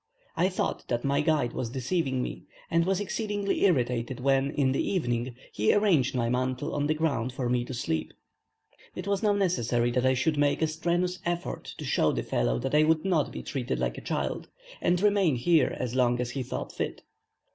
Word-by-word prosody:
I 185 - +2
thought 185 - -2
that 120 -1 -1
my 140 +1 +2
guide 150 -6 +1
was 120 - -3
deceiving 130 +1 -1
me; - - -6 0.3
and 170 +1 +3
was 190 0 +1
exceedingly 205 -1 -1
irritated 125 -6 +1
when, 135 +1 +2
in 140 -2 +1
the 135 - +1
evening, 120 -9 -1 0.2
he 105 - +2
arranged 175 - +3
my 120 -2 +1
mantle 130 +1 -1
on 145 0 0
the 155 - +1
ground 135 -6 0
for 130 -1 -2
me 125 0 +1
to 130 - -6
sleep. 80 -9 -2 0.8
It 180 - -5
was 200 0 0
now 210 -2 +3
necessary 120 - +1
that 125 +1 +2
I 130 - +3
should 145 +4 +1
make 145 +2 +2
a - - +3
strenuous 175 +3 -1
effort 175 0 -3
to - - -6
show - - +2
the - - -2
fellow - - 0
that - - -3
I 150 - +6
would 155 +2 +2
not 170 -6 +1
be - - -6
treated 125 - -3
like - - -2
a - - -12
child, - - -3 0.3
and 175 0 +2
remain 200 -6 +3
here 160 +6 +2
as 125 -2 -2
long 120 -1 +2
as 125 -1 -2
he 135 - -3
thought 125 - -5
fit. - - -4
140 Hz, 205 wpm, -28 LUFS, 125-175 Hz, 0.8 s, I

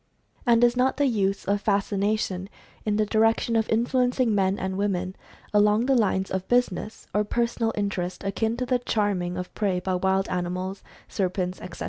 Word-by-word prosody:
And 235 0 +5
is 240 0 +4
not 255 +1 +2
the 285 - +3
use 200 -6 0
of 200 +1 0
fascination 200 -2 0 0.4
in 210 - +2
the 215 0 +2
direction 225 +2 +2
of 225 -1 +1
influencing 245 +1 +2
men 195 -1 +2
and 190 0 -3
women 190 -2 -1 0.4
along 210 +2 +4
the 270 - +3
lines 190 -4 +1
of 190 0 -2
business, 235 -4 0
or 210 - +2
personal 235 +1 0
inter 200 -3 -1
est, 180 +2 -5
akin 225 +3 -1
to 250 - -1
the 250 0 +1
"charming" 200 -7 -1
of 180 0 -6
prey 195 -4 0
by 185 +1 -2
wild 190 +1 +1
animals, 185 +2 -3 0.3
serpents, 185 -1 -2
etc.? 180 -1 -9
205 Hz, 175 wpm, -25 LUFS, 190-225 Hz, 0.4 s, And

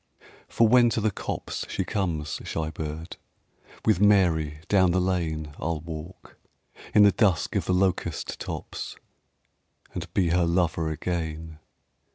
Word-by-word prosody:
For 115 - +3
when 120 +1 +6
to 115 - 0
the 110 0 +1
copse - - -4
she 95 - -1
comes, 85 -9 -2
shy 80 -1 -3
bird, 80 +2 -6 0.7
With 110 -5 +3
Mary 85 -7 +3
down 95 -3 +4
the 90 +2 +2
lane 80 -5 -1
I'll 80 +1 -2
walk, 80 +3 -9 0.6
in 105 - +8
the 100 - +7
dusk 95 -4 +1
of - - 0
the 90 - +1
locust 90 -4 -1
tops, - - -6 1.0
And 85 -1 -6
be 90 -4 +3
her 90 +1 +3
lover 85 -2 +1
again. 80 -1 -4
85 Hz, 140 wpm, -26 LUFS, 80-95 Hz, 1.0 s, in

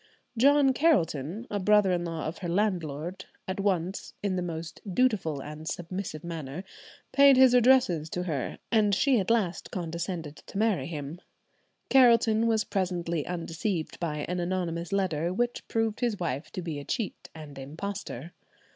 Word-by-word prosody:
John 275 +2 +5
Carelton, 195 - +1
a 205 - -1
brother 210 0 +4
in 175 -1 0
law 165 -2 -4
of 155 - -4
her 175 - -4
landlord, 175 -2 -1 0.2
at 190 +1 -3
once, 190 -2 -1
"in 200 -2 0
the 180 - -1
most 165 -2 -5
dutiful 180 - +1
and 150 +1 -8
submissive 175 -2 -4
manner," 165 -1 -5 0.5
paid 275 0 +7
his 260 -1 +7
addresses 245 -11 +4
to 180 - -3
her, 150 -8 -3
and 210 -3 +4
she 260 +3 +3
at 190 - -2
last 215 -7 0
condescended 170 -3 -4
to - - -10
marry 215 -2 +1
him. 155 +1 -6 0.7
Carelton 230 -3 +5
was 220 -2 +2
presently 175 -5 -2
undeceived 170 +1 -3
by 150 -3 -2
an 180 +1 -2
anonymous 175 -1 -2
letter, 175 -4 0
which 240 +5 -2
proved 225 -1 0
his 235 -4 0
wife 155 -4 -3
to 185 - -4
be 160 -4 -4
a - - -7
cheat 220 - -4
and 145 -3 -9
impostor. 160 +1 -6
180 Hz, 155 wpm, -28 LUFS, 160-215 Hz, 0.7 s, paid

